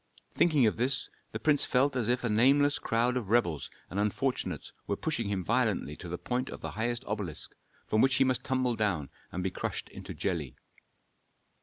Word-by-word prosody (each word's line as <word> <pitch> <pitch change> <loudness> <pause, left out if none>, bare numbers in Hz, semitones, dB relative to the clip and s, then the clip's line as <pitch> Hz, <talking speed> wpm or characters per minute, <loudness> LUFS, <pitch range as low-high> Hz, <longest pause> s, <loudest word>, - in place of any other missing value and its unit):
Thinking 150 -7 +4
of 110 - +2
this, 125 +4 +1 0.2
the - - -3
prince 150 -2 +3
felt 135 +2 +3
as 120 -3 +1
if 125 0 +2
a - - +1
nameless 140 +7 +4
crowd 120 +2 +1
of 115 -6 -2
rebels 95 -10 +1 0.2
and 95 - -4
unfortunates 105 - -1 0.2
were 100 - 0
pushing 115 -5 -1
him 95 -2 -1
violently 75 -1 +1
to 90 - -8
the 90 - -3
point 125 +5 -2
of - - -8
the - - -4
highest 120 +3 -1
obelisk, 100 -7 -3 0.3
from 110 - +2
which 135 -1 +4
he 135 - +5
must 130 -1 +1
tumble 130 -2 +1
down 95 - 0 0.2
and 90 - -3
be 95 - -1
crushed - - -4
into - - -8
jelly. 80 -9 -2
115 Hz, 190 wpm, -30 LUFS, 100-130 Hz, 0.3 s, he